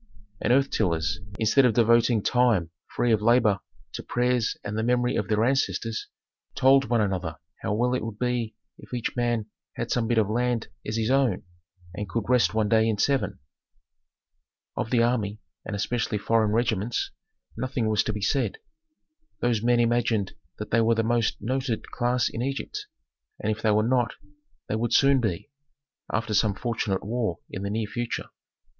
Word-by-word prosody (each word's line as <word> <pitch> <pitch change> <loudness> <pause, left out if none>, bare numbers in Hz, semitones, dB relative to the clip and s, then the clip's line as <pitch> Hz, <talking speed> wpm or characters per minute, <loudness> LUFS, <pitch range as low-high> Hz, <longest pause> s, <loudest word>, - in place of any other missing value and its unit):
And - - +1
earth 135 +2 +3
tillers, 90 -1 0 0.2
instead 110 +5 +4
of 120 -4 +3
devoting 115 -1 +4
time 115 -10 +2 0.2
free 120 - 0
of 110 -2 +3
labor 110 -3 +4 0.3
to - - -4
prayers 125 -2 0
and 100 +1 -4
the 110 - 0
memory 125 +1 +1
of - - -1
their 110 0 +2
ancestors, 120 -3 -1 0.5
told 135 +1 +5
one 120 -1 +1
another 90 -6 -2 0.2
how 105 - -1
well 125 +3 +1
it 125 - -1
would 110 -2 -5
be 120 -2 -1 0.2
if - - -8
each 120 - -3
man 120 -3 0 0.3
had - - -4
some 120 -2 +1
bit 120 0 +1
of 110 -3 +3
land 120 +1 -1 0.2
as 110 +1 -2
his 115 +2 0
own, 135 -8 +2 0.5
and 100 +1 -5
could 115 +3 -1
rest 125 -1 +3
one 110 -1 +2
day 110 0 +3
in 110 - 0
seven. 135 +6 +1 1.4
Of - - -2
the 120 -1 +3
army, 110 -4 0 0.3
and 105 - -4
especially 110 +1 -1
foreign 110 +1 +2
regiments, 115 0 0 0.4
nothing 125 -1 -2
was 110 -1 +3
to - - 0
be 105 -1 -5
said. 135 - 0 0.8
Those 120 -3 +1
men 120 +1 +3
imagined 115 -3 +1 0.2
that - - -7
they 115 - +4
were 115 +1 +3
the 115 - +1
most 115 0 +1
noted 130 +1 -2
class 125 0 +1
in 115 - -4
Egypt, 135 +2 -4 0.5
and 110 - -1
if 110 +1 -4
they 110 - +2
were 105 0 +3
not, 120 -3 +1 0.5
they - - -1
would 115 +2 -1
soon 135 -1 +5
be, 105 -1 -3 0.6
after 110 0 -1
some 105 -1 +2
fortunate 110 -4 -2
war 110 -5 -1
in 95 - -5
the 100 - -3
near 110 +1 -1
future. 120 +2 -4
115 Hz, 175 wpm, -26 LUFS, 105-120 Hz, 1.4 s, told